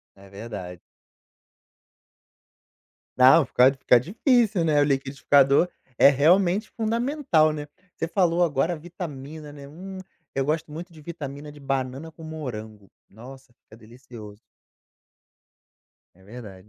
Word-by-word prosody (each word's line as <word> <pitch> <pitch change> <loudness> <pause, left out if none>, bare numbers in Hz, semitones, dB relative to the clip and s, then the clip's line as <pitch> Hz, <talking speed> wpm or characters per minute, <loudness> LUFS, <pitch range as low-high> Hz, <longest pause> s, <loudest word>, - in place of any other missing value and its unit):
É 100 0 -17
verdade. 100 -4 -8 2.4
Não, 130 +5 +7
fica 130 +1 +4
fica 125 -2 +4
difícil, 220 - +1
né, 150 -2 +3
o - - +4
liquidificador 140 +2 +2 0.3
é - - +8
realmente 175 - +3
fundamental, 230 - +1
né. 150 -1 -6 0.3
Você 165 - -3
falou 175 -1 +1
agora, 155 +1 0
a - - -3
vitamina, 155 -3 -9
né, 140 -1 -11
hum, 190 +5 -9 0.4
eu 135 - 0
gosto 160 +2 -2
muito 170 +3 -8
de 155 - -14
vitamina 150 -2 -8
de 145 - -15
banana 135 +3 -3
com 160 - -16
morango. 110 -10 -8 0.2
Nossa, 130 +4 -14
fica 110 - -20
delicioso. 110 -2 -13 1.7
É 95 - -23
verdade, 105 -2 -12
145 Hz, 120 wpm, -24 LUFS, 125-170 Hz, 2.4 s, é